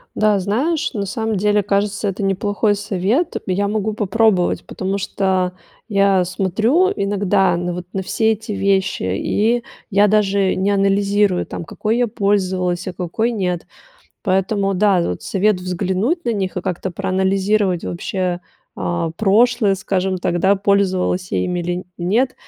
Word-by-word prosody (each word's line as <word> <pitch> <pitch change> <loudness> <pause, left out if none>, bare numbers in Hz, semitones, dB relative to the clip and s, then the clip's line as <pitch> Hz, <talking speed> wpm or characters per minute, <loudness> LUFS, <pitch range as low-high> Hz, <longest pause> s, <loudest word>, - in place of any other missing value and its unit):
Да, 215 -1 +3
знаешь, 270 - -1
на 205 -4 -2
самом 220 +2 -2
деле, 210 +1 +2
кажется, 200 +1 0
это 200 +1 -3
неплохой 205 +2 +1
совет. 205 - -1
Я 195 +2 0
могу 215 +1 -1
попробовать, 210 -2 +1
потому 190 +1 -3
что 190 -2 0 0.3
я 195 -3 +3
смотрю 220 - +1
иногда 195 -2 +1
на 175 0 -2
вот, 180 0 -6
на 195 - -1
все 220 +4 +1
эти 220 0 -4
вещи, 195 -1 0
и 215 - 0 0.3
я 205 +1 +5
даже 200 -2 +2
не 190 +2 +1
анализирую, 200 -1 +2
там, - - -6
какой 215 +7 -2
я 245 0 +2
пользовалась, 190 -4 0
а 185 - -4
какой 190 +7 -1
нет. 180 -6 -2 0.6
Поэтому, 195 +1 +1
да, 195 -1 +3
вот 90 - -3
совет 205 +1 +1
взглянуть 190 - -1
на 235 - 0
них 190 -4 -3
и 180 - -2
как-то 185 +1 -3
проанализировать 190 0 0
вообще, 180 0 -2 0.4
а, 170 -1 -2
прошлое, 220 +1 +3
скажем 190 0 -1
так, 175 0 -1
да, 195 +3 +4
пользовалась 190 -2 +1
я - - 0
ими 180 -1 -2
или 175 +1 -3
нет, 220 +9 +1
195 Hz, 150 wpm, -19 LUFS, 185-210 Hz, 0.6 s, я